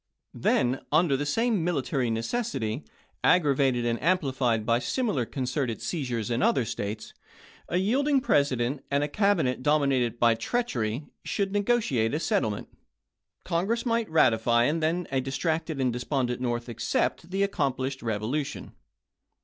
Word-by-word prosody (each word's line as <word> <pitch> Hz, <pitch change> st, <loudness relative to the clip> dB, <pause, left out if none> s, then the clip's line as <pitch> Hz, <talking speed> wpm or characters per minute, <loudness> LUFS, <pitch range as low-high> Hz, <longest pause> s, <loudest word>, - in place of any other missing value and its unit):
Then 125 Hz, +2 st, +1 dB
under 160 Hz, -4 st, +3 dB
the 145 Hz, +2 st, -2 dB
same 225 Hz, +2 st, +1 dB
military 135 Hz, -7 st, 0 dB
necessity, 115 Hz, -, -2 dB, 0.4 s
aggravated 140 Hz, -7 st, +3 dB
and 115 Hz, 0 st, -1 dB
amplified 130 Hz, -9 st, +1 dB
by 115 Hz, +1 st, +2 dB
similar 200 Hz, -, -1 dB
concerted 125 Hz, -2 st, -2 dB
seizures 125 Hz, -, -3 dB
in 120 Hz, +2 st, 0 dB
other 130 Hz, -4 st, +3 dB
States, 105 Hz, 0 st, -5 dB, 0.6 s
a 175 Hz, -, +1 dB
yielding 270 Hz, +9 st, +2 dB
President, 140 Hz, -, +1 dB
and 140 Hz, +1 st, +1 dB
a -, -, 0 dB
Cabinet 165 Hz, -, +1 dB
domi 145 Hz, 0 st, +3 dB
nated 120 Hz, -2 st, 0 dB
by 120 Hz, -1 st, +4 dB
treachery, 120 Hz, -, -2 dB, 0.2 s
could 200 Hz, -2 st, -1 dB
negotiate 200 Hz, -, +1 dB
a -, -, 0 dB
settlement; 110 Hz, -9 st, -1 dB, 0.8 s
Congress 195 Hz, +8 st, 0 dB
might 230 Hz, -2 st, 0 dB
ratify, 120 Hz, -6 st, +3 dB
and 155 Hz, +5 st, 0 dB, 0.3 s
a 135 Hz, -1 st, +1 dB
distracted 155 Hz, +3 st, -2 dB
and 130 Hz, -2 st, +1 dB
de 120 Hz, -, -3 dB
spondent 125 Hz, -2 st, -1 dB
North 120 Hz, -1 st, -2 dB
accept 120 Hz, +7 st, -1 dB
the 195 Hz, +2 st, 0 dB
accomplished 135 Hz, -7 st, -1 dB
revolution. 115 Hz, +6 st, -3 dB
135 Hz, 135 wpm, -27 LUFS, 120-175 Hz, 0.8 s, by